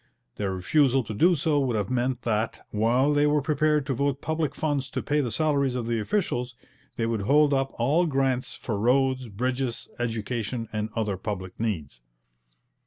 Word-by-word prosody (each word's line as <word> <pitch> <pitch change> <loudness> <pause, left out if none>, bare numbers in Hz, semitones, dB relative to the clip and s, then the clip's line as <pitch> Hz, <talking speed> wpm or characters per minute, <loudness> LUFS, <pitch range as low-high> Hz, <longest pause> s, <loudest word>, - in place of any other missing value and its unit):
Their 100 -2 -1
refusal 135 - +3
to 110 - -6
do 175 - +4
so 150 -1 +1
would 130 -4 0
have 105 0 -1
meant 125 0 0
that, 110 -1 -1
while 120 +7 +2
they 145 0 +3
were 150 0 +3
prepared 150 0 +1
to 135 - -1
vote 140 +2 0
public 160 -2 -2
funds 145 -4 -1
to - - -3
pay 150 +1 +1
the 125 - -2
salaries 140 -3 +1
of 120 -2 -2
the 115 -1 0
officials, 125 - -1 0.4
they 115 - -1
would 115 -2 -1
hold 145 +7 +4
up 135 0 +1
all 150 +9 +2
grants 135 -3 0
for 105 -4 -4
roads, 130 +2 +2
bridges, 125 +3 -2
education, 115 0 -2
and 105 0 -2
other 105 -4 -1
public 95 -2 -5
needs. 80 - -3
125 Hz, 175 wpm, -26 LUFS, 115-145 Hz, 0.4 s, do